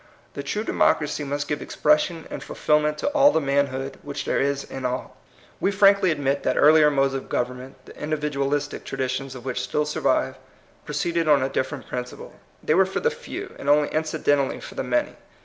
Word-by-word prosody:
The -, -, -5 dB
true 175 Hz, +10 st, -3 dB
democracy 150 Hz, -8 st, +1 dB
must 145 Hz, +1 st, -3 dB
give 150 Hz, -1 st, -2 dB
expression 155 Hz, +2 st, +1 dB
and -, -, -5 dB
fulfilment 150 Hz, 0 st, +1 dB
to -, -, -2 dB
all 290 Hz, -1 st, +5 dB
the 160 Hz, -, +2 dB
manhood 140 Hz, -2 st, -1 dB
which 145 Hz, 0 st, -5 dB
there -, -, 0 dB
is 140 Hz, 0 st, 0 dB
in 135 Hz, -, -8 dB
all. 125 Hz, 0 st, -3 dB, 0.4 s
We -, -, +2 dB
frankly 200 Hz, -1 st, +5 dB
admit 140 Hz, -3 st, 0 dB
that 130 Hz, -, 0 dB
earlier 150 Hz, 0 st, +6 dB
modes 135 Hz, -1 st, +1 dB
of 135 Hz, -, -5 dB
government, 125 Hz, +2 st, -3 dB
the -, -, -13 dB
individualistic 145 Hz, -1 st, -2 dB
tradi 130 Hz, -1 st, -2 dB
tions 135 Hz, 0 st, -4 dB
of 125 Hz, 0 st, -10 dB
which 130 Hz, -2 st, -2 dB
still 150 Hz, -, -1 dB
survive, 150 Hz, -, 0 dB, 0.5 s
proceeded 170 Hz, -1 st, -1 dB
on 145 Hz, -3 st, +5 dB
a 135 Hz, -, 0 dB
different 135 Hz, +1 st, -3 dB
principle. 125 Hz, 0 st, -6 dB, 0.3 s
They -, -, +2 dB
were 190 Hz, +3 st, +4 dB
for 190 Hz, -, -2 dB
the 475 Hz, -, +1 dB
few, 465 Hz, -5 st, -8 dB
and 140 Hz, -, -3 dB
only 145 Hz, 0 st, +4 dB
incidentally 155 Hz, -3 st, 0 dB
for -, -, -10 dB
the -, -, -3 dB
many. 125 Hz, -1 st, -1 dB
145 Hz, 190 wpm, -24 LUFS, 135-155 Hz, 0.5 s, earlier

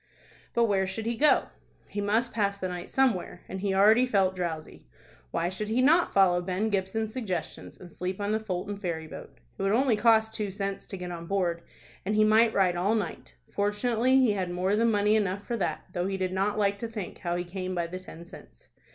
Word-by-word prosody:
But 235 Hz, -, +4 dB
where 195 Hz, -4 st, +2 dB
should 215 Hz, +4 st, -4 dB
he 235 Hz, +1 st, -1 dB
go? 295 Hz, +6 st, +3 dB, 0.4 s
He 205 Hz, -, -4 dB
must 225 Hz, +4 st, 0 dB
pass 200 Hz, -2 st, 0 dB
the 190 Hz, -, -3 dB
night 180 Hz, -1 st, -6 dB
somewhere, 225 Hz, -9 st, 0 dB
and 190 Hz, -, -6 dB
he 200 Hz, -1 st, 0 dB
already 220 Hz, +6 st, +5 dB
felt 195 Hz, -5 st, +2 dB
drowsy. 165 Hz, -4 st, -5 dB, 0.4 s
Why 170 Hz, -, -1 dB
should 190 Hz, +4 st, -4 dB
he 230 Hz, +3 st, +1 dB
not 315 Hz, +7 st, +4 dB
follow 180 Hz, -3 st, +4 dB
Ben 185 Hz, +4 st, -1 dB
Gibson's 205 Hz, +3 st, -1 dB
suggestions, 190 Hz, -10 st, -5 dB
and 175 Hz, -2 st, -12 dB
sleep 185 Hz, +2 st, -4 dB
on 205 Hz, 0 st, -1 dB
the 220 Hz, -, +1 dB
Fulton 200 Hz, -1 st, -4 dB
ferry 170 Hz, -5 st, -3 dB
boat? 155 Hz, -, -11 dB, 0.2 s
It -, -, -3 dB
would 195 Hz, +1 st, +1 dB
only 250 Hz, 0 st, +3 dB
cost 220 Hz, 0 st, +3 dB
two 210 Hz, -2 st, -3 dB
cents 195 Hz, 0 st, -4 dB
to 195 Hz, -, -6 dB
get 180 Hz, -1 st, -6 dB
on 170 Hz, -1 st, -7 dB
board, 175 Hz, -3 st, 0 dB, 0.4 s
and 210 Hz, +3 st, -1 dB
he 215 Hz, -, +5 dB
might 220 Hz, +1 st, +5 dB
ride 185 Hz, -4 st, +2 dB
all 195 Hz, +6 st, +1 dB
night. 205 Hz, -7 st, -4 dB, 0.2 s
Fortunately 230 Hz, +5 st, +1 dB
he 255 Hz, -4 st, +4 dB
had 190 Hz, -3 st, -2 dB
more 185 Hz, +3 st, 0 dB
than 230 Hz, +2 st, +3 dB
money 210 Hz, 0 st, +3 dB
enough 200 Hz, -1 st, -1 dB
for 240 Hz, -, -2 dB
that, 170 Hz, -6 st, -2 dB
though 175 Hz, 0 st, -1 dB
he 195 Hz, 0 st, -2 dB
did 185 Hz, -1 st, -2 dB
not 200 Hz, +2 st, 0 dB
like 200 Hz, -1 st, +1 dB
to 230 Hz, -, -3 dB
think 215 Hz, -5 st, -7 dB
how 175 Hz, -1 st, -2 dB
he 175 Hz, -, -2 dB
came 185 Hz, +1 st, -5 dB
by 170 Hz, -1 st, 0 dB
the 180 Hz, +2 st, -6 dB
ten 170 Hz, -2 st, -11 dB
cents. 60 Hz, -, -15 dB
200 Hz, 220 wpm, -28 LUFS, 180-220 Hz, 0.4 s, already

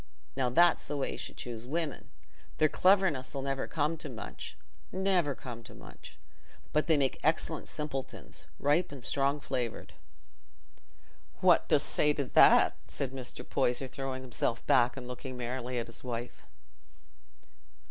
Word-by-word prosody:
Now, 130 Hz, -2 st, +1 dB
that's 170 Hz, +7 st, +4 dB
the 145 Hz, -, -2 dB
way 135 Hz, -, -1 dB
you -, -, -5 dB
should -, -, -6 dB
choose 120 Hz, -1 st, -6 dB
women. 160 Hz, +1 st, -3 dB, 0.5 s
Their 155 Hz, -, +4 dB
cleverness 185 Hz, -10 st, +3 dB
'll 135 Hz, -, -2 dB
never 135 Hz, -1 st, -2 dB
come 155 Hz, +1 st, 0 dB
to 150 Hz, -, -7 dB
much—never 175 Hz, -, -3 dB
come 120 Hz, -3 st, -8 dB
to 115 Hz, -, -12 dB
much—but 150 Hz, -, -7 dB
they 160 Hz, -2 st, +4 dB
make 135 Hz, -2 st, +1 dB
excellent 160 Hz, 0 st, 0 dB
simpletons, 150 Hz, -3 st, -6 dB
ripe 150 Hz, +5 st, +2 dB
and 135 Hz, -4 st, -9 dB
strong 140 Hz, +3 st, +1 dB
flavoured." 125 Hz, -5 st, -3 dB, 1.5 s
"What -, -, +5 dB
dost -, -, +3 dB
say 150 Hz, 0 st, +2 dB
to 145 Hz, -1 st, -2 dB
that?" -, -, +6 dB
said 135 Hz, -2 st, -3 dB
Mr. 125 Hz, -1 st, -7 dB
Poyser, 130 Hz, -1 st, +1 dB
throwing 130 Hz, 0 st, -5 dB
himself 120 Hz, -1 st, -2 dB
back 120 Hz, +1 st, +4 dB
and 125 Hz, -2 st, -6 dB
looking 125 Hz, +1 st, -6 dB
merrily 125 Hz, +1 st, -3 dB
at 115 Hz, -, -1 dB
his 115 Hz, -, -9 dB
wife. 120 Hz, -1 st, -5 dB
135 Hz, 145 wpm, -31 LUFS, 125-150 Hz, 1.5 s, that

